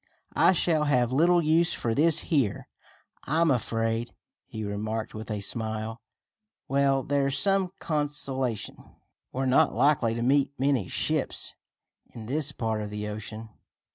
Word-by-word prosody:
"I - - +5
shall 160 -4 +2
have 125 -4 +2
little 170 +5 +4
use 165 +2 +3
for 115 - -1
this 155 +4 +3
here, 140 - 0 0.6
I'm 160 +2 +2
afraid," 115 -1 -1 0.3
he 110 - -6
remarked 110 +2 -3
with 110 +2 -8
a 105 -2 -3
smile. 110 +1 -4 0.7
"Well, 135 0 +2
there's 140 0 0
some 195 +4 +2
consolation. 140 -6 -2 0.5
We're 135 +1 -2
not 130 +1 +3
likely 130 -6 +2
to 115 - -2
meet 140 +2 +1
many 135 -8 +1
ships - - +1 0.6
in 115 -2 -8
this 145 +4 +1
part 110 -2 -2
of 105 - -5
the 105 0 -5
ocean. 110 +1 -7
130 Hz, 140 wpm, -27 LUFS, 110-145 Hz, 0.7 s, I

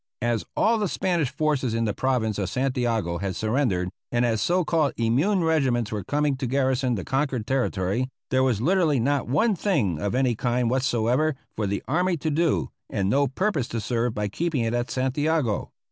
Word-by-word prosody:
As 120 -2 0
all 225 +1 +3
the 205 - +1
Spanish 170 -5 0
forces 135 -4 0
in 115 0 +1
the 105 - 0
province 115 -5 0
of 95 - -1
Santiago 120 -9 -1
had 95 -2 -3
surrendered, 110 -6 0 0.2
and 120 0 +2
as 115 -2 0
so 180 0 +2
called 155 -3 +1
immune 145 - +2
regiments 130 -8 +1
were 105 -3 -3
coming 145 +5 0
to 130 -1 -3
garrison 130 -1 +1
the 95 - -4
conquered 135 -4 -1
territory, 125 -2 0 0.2
there 130 0 +3
was 125 -5 +1
literally 160 -2 +2
not 140 +3 0
one 195 - +2
thing 130 - 0
of 100 +3 -1
any 130 -2 +2
kind 120 +1 0
whatsoever 130 +3 +1 0.2
for 105 - -1
the 100 +1 -2
army 175 +5 +1
to 155 +1 -2
do, 165 +1 +1 0.2
and 95 0 0
no 140 +3 +3
purpose 145 - -1
to 115 - -3
serve 115 +1 -1
by 105 0 -1
keeping 155 +5 -1
it 115 0 -1
at 120 0 -1
Santiago. 130 -2 0
130 Hz, 190 wpm, -25 LUFS, 115-150 Hz, 0.2 s, all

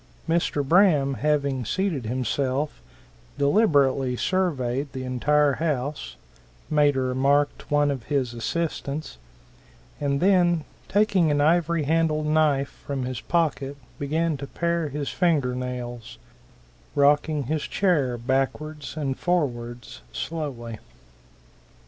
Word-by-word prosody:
Mr. 165 -4 0
Braham 160 -6 +4
having 140 -2 0
seated 160 - -1
himself, 130 - -1 0.6
deliberately 140 - +3
surveyed 140 -6 -1
the 130 -1 -5
entire 140 +3 +2
house, 145 - -2 0.6
made 145 -2 +4
a 130 - +1
remark 135 +3 +2
to - - -14
one 145 -1 +2
of 130 -5 -5
his 130 -4 -1
assistants, 150 - -3 0.8
and 140 -1 0
then 175 -3 +3 0.2
taking 200 -4 +3
an 145 -1 +2
ivory 165 +1 +2
handled 155 0 +1
knife 150 -3 +1
from 135 -3 -2
his 125 -2 -4
pocket 145 -5 -1 0.2
began 155 +2 0
to 140 0 -7
pare 170 0 -1
his 145 0 -3
finger 155 -9 +1
nails, 120 - -5 0.8
rocking 145 +1 +3
his 155 +4 -1
chair 145 -12 +1
backwards 135 +5 -2
and 135 -3 -2
forwards 120 - -2
slowly. 120 - -5
145 Hz, 110 wpm, -25 LUFS, 130-160 Hz, 0.8 s, Braham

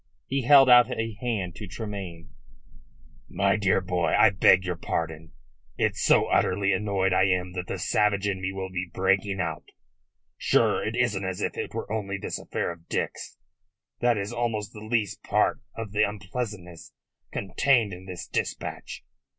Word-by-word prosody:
He 135 +1 -1
held 135 +1 +7
out 120 -1 +7
a 115 0 -2
hand 105 -8 -2
to 105 - -7
Tremayne. 95 -5 -7 1.0
"My 100 +2 +2
dear 100 -3 +2
boy, 90 -3 0
I 110 - +6
beg 95 0 +5
your 90 -1 -2
pardon. 80 -1 -4 0.5
It's - - 0
so - - +4
utterly 100 +1 +2
annoyed 95 -1 0
I 95 - +4
am 90 -1 0
that 90 -1 -5
the - - -3
savage 105 -1 +1
in 95 -2 -2
me 95 0 -2
will 95 -1 -5
be 90 -1 -4
breaking 95 +1 +1
out. - - -3 0.7
Sure, - - +2
it 110 - -2
isn't 120 -6 0
as 95 -1 -3
if - - -2
it - - -5
were - - -5
only 100 -3 -2
this - - -4
affair - - -3
of 85 0 -13
Dick's. - - -3 0.6
That 120 -1 +2
is 100 +3 -4
almost 115 -3 -2
the 105 - -9
least 110 -2 -1
part - - +1
of 115 -3 -6
the 105 +1 +1
unpleasantness 100 -3 -4 0.4
contained 110 +2 +1
in 90 +1 -10
this 90 -2 -6
dispatch. - - -4
100 Hz, 165 wpm, -26 LUFS, 90-110 Hz, 1.0 s, held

